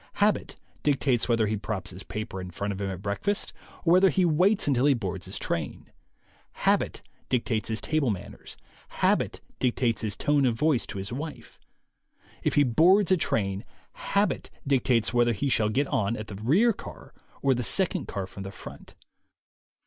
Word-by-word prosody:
Habit 205 Hz, +1 st, +1 dB, 0.3 s
dictates 135 Hz, -4 st, +1 dB
whether 115 Hz, -2 st, +3 dB
he 110 Hz, +1 st, 0 dB
props 100 Hz, -2 st, -4 dB
his 90 Hz, +2 st, -8 dB
paper 105 Hz, -1 st, -5 dB
in 90 Hz, -, -7 dB
front 100 Hz, +3 st, -3 dB
of 100 Hz, -, -6 dB
him 100 Hz, -, -1 dB
at 95 Hz, 0 st, -6 dB
breakfast 150 Hz, -, -2 dB, 0.3 s
or 165 Hz, -, +5 dB
whether 185 Hz, +1 st, +6 dB
he 185 Hz, -1 st, +2 dB
waits 180 Hz, +5 st, +3 dB
until 135 Hz, -1 st, +3 dB
he 140 Hz, -, +5 dB
boards 95 Hz, -7 st, -4 dB
his -, -, -6 dB
train. -, -, -4 dB, 0.6 s
Habit -, -, 0 dB, 0.3 s
dictates 115 Hz, -4 st, 0 dB
his 110 Hz, -1 st, -1 dB
table 155 Hz, -5 st, +1 dB
manners. 100 Hz, -5 st, -6 dB, 0.4 s
Habit -, -, +2 dB, 0.2 s
dictates 120 Hz, -2 st, +1 dB
his 110 Hz, -2 st, -3 dB
tone 145 Hz, -2 st, +2 dB
of 120 Hz, -, +1 dB
voice 150 Hz, -1 st, +1 dB
to -, -, -6 dB
his 95 Hz, +4 st, -4 dB
wife. 150 Hz, +4 st, -7 dB, 0.8 s
If -, -, 0 dB
he 145 Hz, -, +6 dB
boards 175 Hz, -, +4 dB
a -, -, +7 dB
train, 100 Hz, -, -1 dB, 0.3 s
habit 200 Hz, +1 st, -1 dB, 0.2 s
dictates 125 Hz, -4 st, +2 dB
whether 120 Hz, -1 st, +3 dB
he 115 Hz, +7 st, -1 dB
shall 110 Hz, -4 st, +2 dB
get 135 Hz, +7 st, +1 dB
on 105 Hz, -3 st, 0 dB
the 105 Hz, -3 st, -7 dB
rear 190 Hz, -, +4 dB
car -, -, -11 dB, 0.3 s
or 135 Hz, -1 st, +4 dB
the 125 Hz, -, -2 dB
second 185 Hz, -, +1 dB
car 100 Hz, -2 st, -3 dB
from 95 Hz, -, -10 dB
the 95 Hz, 0 st, -6 dB
front. -, -, -11 dB
120 Hz, 175 wpm, -27 LUFS, 105-150 Hz, 0.8 s, a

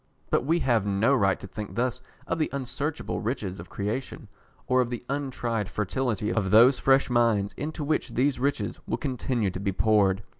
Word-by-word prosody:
But -, -, +2 dB
we 160 Hz, +5 st, +2 dB
have 115 Hz, -6 st, +2 dB
no 100 Hz, +7 st, +2 dB
right 100 Hz, -7 st, +2 dB
to -, -, -8 dB
think 105 Hz, +2 st, -7 dB
thus 125 Hz, +1 st, -1 dB, 0.2 s
of -, -, -2 dB
the 155 Hz, -, +1 dB
unsearchable 140 Hz, +3 st, -3 dB
riches 105 Hz, -5 st, -3 dB
of 85 Hz, -1 st, -10 dB
creation, 105 Hz, +6 st, -4 dB, 0.4 s
or 130 Hz, 0 st, +3 dB
of 120 Hz, -, -1 dB
the 120 Hz, 0 st, -5 dB
untried 120 Hz, -7 st, -2 dB
fertility 105 Hz, 0 st, -1 dB
of 100 Hz, -4 st, 0 dB
those 120 Hz, +6 st, +6 dB
fresh 135 Hz, 0 st, +4 dB
minds 115 Hz, -5 st, +2 dB
into 155 Hz, +1 st, -4 dB
which 145 Hz, -5 st, -1 dB
these 135 Hz, +2 st, +2 dB
riches 140 Hz, +2 st, -1 dB
will -, -, -1 dB
continue 125 Hz, -6 st, -1 dB
to 90 Hz, -, -6 dB
be 100 Hz, 0 st, -1 dB
poured. 100 Hz, -1 st, +2 dB
120 Hz, 185 wpm, -27 LUFS, 105-135 Hz, 0.4 s, those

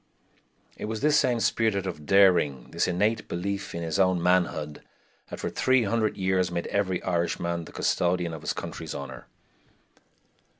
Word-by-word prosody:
It -, -, -5 dB
was 110 Hz, 0 st, -4 dB
this 150 Hz, 0 st, +4 dB
same 125 Hz, -3 st, +1 dB
spirit 110 Hz, -4 st, +1 dB
of 75 Hz, -6 st, -6 dB
daring, 90 Hz, -10 st, +4 dB
this -, -, 0 dB
innate 105 Hz, +5 st, 0 dB
belief 100 Hz, +2 st, -4 dB
in 85 Hz, -, -3 dB
his 80 Hz, +3 st, -2 dB
own 95 Hz, -2 st, +3 dB
manhood, 85 Hz, -4 st, 0 dB, 0.5 s
that -, -, -7 dB
for -, -, -3 dB
three 130 Hz, -1 st, +3 dB
hundred 110 Hz, 0 st, 0 dB
years 95 Hz, -1 st, +1 dB
made 85 Hz, -1 st, -3 dB
every 95 Hz, -3 st, 0 dB
Irishman 85 Hz, -1 st, -1 dB
the -, -, -12 dB
custodian 90 Hz, -1 st, 0 dB
of 80 Hz, -, -7 dB
his -, -, -2 dB
country's -, -, -6 dB
honor. 70 Hz, -1 st, -8 dB
95 Hz, 160 wpm, -27 LUFS, 85-100 Hz, 0.5 s, this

